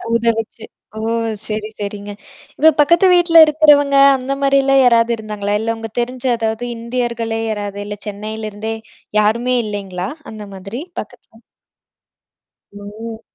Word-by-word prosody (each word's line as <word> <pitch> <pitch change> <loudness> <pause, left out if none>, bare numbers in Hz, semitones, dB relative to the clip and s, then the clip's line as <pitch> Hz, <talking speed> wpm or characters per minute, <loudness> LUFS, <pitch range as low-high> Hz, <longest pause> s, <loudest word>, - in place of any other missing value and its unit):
உதவுச்சு. 230 -1 -1 0.3
ஓ! - - -4 0.5
சரி, 215 0 -4
சரிங்க. 205 0 -5 0.5
இப்ப 320 +1 +6
பக்கத்து 340 +5 +5
வீட்ல 345 -1 +4
இருக்கிறவங்க 295 -2 +4 0.2
அந்த 260 +1 -3
மாரிலாம் 275 -1 +4
யாராவது 235 -1 +4
இருந்தாங்களா? 210 -2 -4
இல்ல 225 +1 -1
உங்க 225 0 -7
தெரிஞ்ச 250 +1 -5
அதாவது 225 +1 -2
இந்தியர்களே 235 -1 -3
யாராது? 205 -2 -4
இல்ல 205 0 -6
சென்னையில 215 +1 -5
இருந்தே 220 +2 -4 0.4
யாருமே 235 +4 +1
இல்லைங்களா? 195 -3 -4 0.2
அந்த 215 -1 -8
மாதிரி 195 +7 -7 0.2
பக்கத்துல. 235 -2 -17 1.3
ஓ. 215 +3 -9
225 Hz, 120 wpm, -17 LUFS, 210-250 Hz, 1.3 s, இப்ப